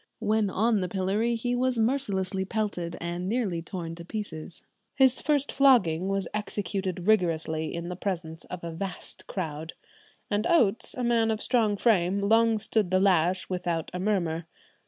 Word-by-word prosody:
When 215 -2 +1
on 215 +2 +2
the 180 - -2
pillory 205 +5 0
he 245 +2 -2
was 250 0 +1
mercilessly 200 -6 0
pelted, 190 -5 -3
and 175 +2 -3
nearly 205 -8 -1
torn 165 -1 -6
to 170 - -8
pieces. 175 -5 -7 0.3
His 265 -1 +4
first 290 -1 +1
flogging 195 -11 +4
was 195 0 -1
executed 195 -3 -3
rigorously 160 -6 +1
in 170 +1 -4
the 180 - -4
presence 170 -4 -4
of 180 -1 -8
a 170 - -4
vast 180 +2 -6
crowd, 160 -3 -4 0.5
and 205 0 0
Oates, 235 - +2
a 250 - -3
man 230 -2 +2
of 220 -1 0
strong 220 -5 +1
frame, 195 -4 +2
long 225 +2 +3
stood 215 -2 0
the 185 +1 +3
lash 185 -1 +2
without 175 -3 -2
a 180 - -3
murmur. 175 -5 -1
195 Hz, 160 wpm, -27 LUFS, 175-220 Hz, 0.5 s, His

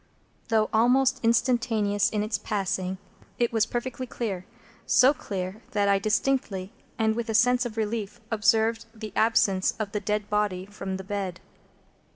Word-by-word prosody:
Though 220 -2 +2
almost 255 +4 +4
instantaneous 225 -3 +2
in 210 -1 -1
its 215 0 -2
passing, 190 -2 -2 0.4
it 240 -1 +1
was 225 -1 +2
perfectly 255 +1 -4
clear; 195 -7 -4 0.4
so 255 +5 +6
clear 195 -4 -5
that 205 -1 +2
I 200 0 +4
distinctly, 210 -3 0 0.3
and 220 -1 +2
with 235 -1 -3
a 220 - 0
sense 245 +2 +4
of 225 -1 -11
relief, 220 0 -2
observed 225 +1 +2
the 215 -2 -8
absence 200 -4 +2
of 215 -3 -3
the 210 - -1
dead 210 0 -2
body 205 -3 0
from 195 -1 -5
the 190 - -7
bed. 190 -2 -4
215 Hz, 155 wpm, -26 LUFS, 200-230 Hz, 0.4 s, so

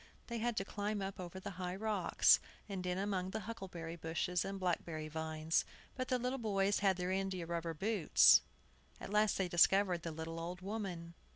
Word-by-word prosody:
They 235 -1 -3
had 235 0 -1
to 195 - 0
climb 205 +1 -2
up 195 -1 -4
over 180 +1 -6
high 180 -1 -4
rocks, 205 -3 +4 0.3
and 195 -3 -4
in 180 0 -1
among 190 -2 -1
huckleberry 190 -7 -5
bushes 170 +1 -1
and 195 0 -4
black 180 -2 0
berry 155 -2 -5
vines. 160 +1 -1 0.3
But 255 -1 -3
the 255 - +2
little 250 +2 -2
boys 200 -3 +1
had 195 -2 +3
their 180 0 -2
india 190 -2 -1
rubber 165 -1 -3
boots. 155 - +5 0.6
At - - -7
last 210 0 +3
they 190 - +1
discovered 180 +1 +4
the 165 - -4
little 160 +1 -5
old 175 +2 -5
woman. 185 -5 -5
185 Hz, 180 wpm, -36 LUFS, 170-205 Hz, 0.6 s, boots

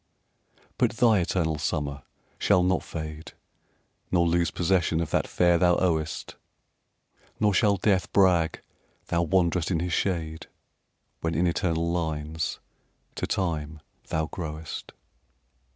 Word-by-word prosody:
But - - +3
thy 115 -3 +4
eternal 80 -3 0
summer 70 -2 -2 0.4
shall 90 - +4
not 95 0 +2
fade, 80 -1 -7 0.8
Nor 85 -2 +3
lose 85 -1 +2
possession 85 -1 +1
of 85 -2 -2
that - - +1
fair 85 -1 +3
thou 90 -1 +4
owest; 80 -3 -1 1.0
Nor 105 -1 +3
shall 100 +1 +3
death 95 0 +1
brag 90 -5 +3 0.5
thou 85 - +2
wanderest 85 -1 +1
in 85 -4 +1
his 90 +1 -2
shade, 80 -4 -2 0.7
When 80 0 -2
in 85 - +2
eternal 85 -1 0
lines 80 -2 -2 0.5
to - - -3
time 80 -5 -2 0.3
thou 80 0 0
growest. 80 -3 -6
85 Hz, 120 wpm, -26 LUFS, 80-90 Hz, 1.0 s, thy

